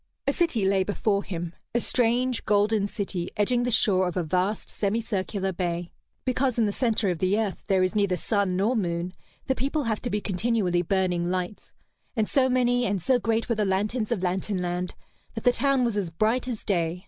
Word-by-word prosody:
A 280 - +2
city 305 - +1
lay 190 0 +3
before 200 0 0
him, 175 -2 -5 0.2
a - - +4
strange 245 +1 +1
golden 205 0 +2
city 190 -4 -3
edging 240 +4 +2
the 245 - 0
shore 195 -5 +3
of 180 - -3
a 180 - +1
vast, 185 +6 0
semi 210 +2 -1
circular 195 -3 -2
bay. 175 -1 -2 0.3
Because 255 -1 +1
in 230 - +3
the 205 - +1
centre 220 -3 +1
of 170 - -4
the 190 +3 +2
earth 210 -4 -3
there 190 -3 +3
is 185 - +1
neither 200 -4 +1
sun 200 -2 0
nor 210 +7 +2
moon, 175 -3 -1 0.3
the 265 - +2
people 280 +4 -1
have 220 -3 -1
to 245 - -3
be 210 -1 0
continually 195 -3 0
burning 180 -1 0
lights; 185 +2 -3 0.4
and 220 -3 +1
so 260 -2 +3
many 245 -1 +2
and 200 -4 0
so 250 +8 +2
great 225 -1 0
were 235 - +1
the 215 -1 0
lanterns 210 +4 0
of 205 -6 0
Lantern 190 +2 -1
Land 180 0 -3 0.4
that 225 - -5
the 245 - +6
town 270 +1 +2
was 235 -3 0
as 200 -5 -1
bright 220 +9 0
as 240 -4 -4
day. 170 -3 0
205 Hz, 205 wpm, -26 LUFS, 185-235 Hz, 0.4 s, the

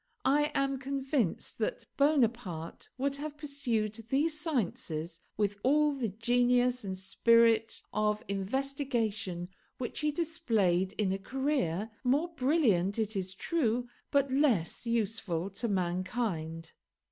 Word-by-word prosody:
I 295 +2 +3
am 275 -1 +1
convinced 270 - -1
that - - -2
Bonaparte 235 - 0
would 275 +1 0
have 295 +1 -6
pursued 260 -8 -1 0.2
these 305 +4 +1
sciences 170 - -2 0.2
with 205 -1 0
all 295 +4 +3
the 255 -5 -2
genius 245 +3 +2
and 190 -2 -4
spirit 225 +3 +3
of 210 +1 0
investigation 220 -4 -2 0.3
which 245 - -4
he 300 0 +1
displayed 215 - +1
in 205 -3 0
a 195 - -2
career, 225 - -1
more 285 +7 +2
brilliant 255 - +2
it 220 -1 -1
is 190 -1 -2
true, 245 - 0 0.2
but 280 -2 +2
less 250 - +1
useful 205 -6 -1
to 230 +5 -2
mankind. 180 -3 -2
230 Hz, 120 wpm, -31 LUFS, 195-275 Hz, 0.3 s, I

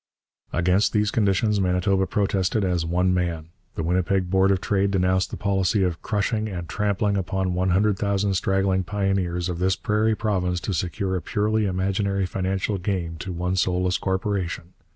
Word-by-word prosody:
Against 90 +5 +2
these 105 0 +2
conditions 105 0 +2
Manitoba 95 +1 +1
protested 100 +1 0
as 90 -3 0
one 90 +2 +2
man. 85 -3 -2 0.3
The 80 - -2
Winnipeg 90 +2 0
Board 95 0 +4
of 95 -1 +2
Trade 100 0 +1
denounced 95 0 +1
the - - -6
policy 95 0 +1
of 90 -3 -1
'crushing 110 +1 -1
and 90 -4 -5
trampling 105 +1 0
upon 95 0 -1
one 90 +1 0
hundred 100 +2 +2
thousand 100 0 0
struggling 95 0 +1
pioneers 90 -2 -1
of 90 -2 -4
this 95 +1 +2
prairie 110 +1 +1
province 90 -5 -1
to 100 - -3
secure 95 +3 -2
a 90 - -2
purely 105 +3 0
imaginary 95 +1 0
financial 95 +2 -2
gain 90 -3 -2
to 95 - -6
one 90 +1 -2
soulless 90 0 +1
corporation.' 95 -3 -2
95 Hz, 165 wpm, -24 LUFS, 90-100 Hz, 0.3 s, Board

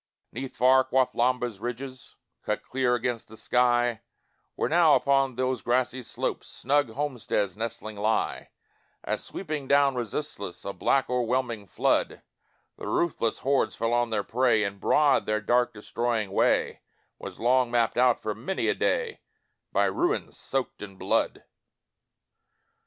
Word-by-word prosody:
'Neath 130 +2 -7
far 130 +1 +5
Quathlamba's 125 -3 +1
ridges 125 +3 -7 0.3
Cut - - -2
clear 125 -1 +1
against 120 -1 -2
the 110 - -13
sky, 120 -2 +2 0.5
Where - - 0
now, 165 -2 +5
upon 135 0 +2
those 130 -2 -1
grassy 125 +2 0
slopes, 120 - -4
Snug 145 0 0
homesteads 115 -7 -2
nestling 110 -1 -5
lie; 110 +2 -1 0.5
As - - -2
sweeping 155 -7 -5
down 140 0 +4
resistless, 115 -6 -5
A 100 - -3
black 135 +6 +1
o'erwhelming 120 -3 -1
flood, - - 0 0.5
The - - -7
ruthless 145 -9 0
hordes 140 0 +2
fell 115 +1 -1
on 120 0 +2
their 105 -2 -1
prey, 120 -2 +2
And 100 -1 -4
broad 145 +7 +3
their 110 0 +1
dark 120 +3 +2
destroying 110 -1 -2
way - - +1 0.4
Was - - -8
long 125 +1 +3
mapped 120 -1 +1
out, 125 -1 +4
for 110 - -3
many 125 - -2
a - - +3
day, 475 -1 -1 0.5
By - - +3
ruins 350 +6 -1
soaked 135 -1 -3
in 100 -2 -8
blood. - - 0
125 Hz, 140 wpm, -27 LUFS, 110-130 Hz, 0.5 s, far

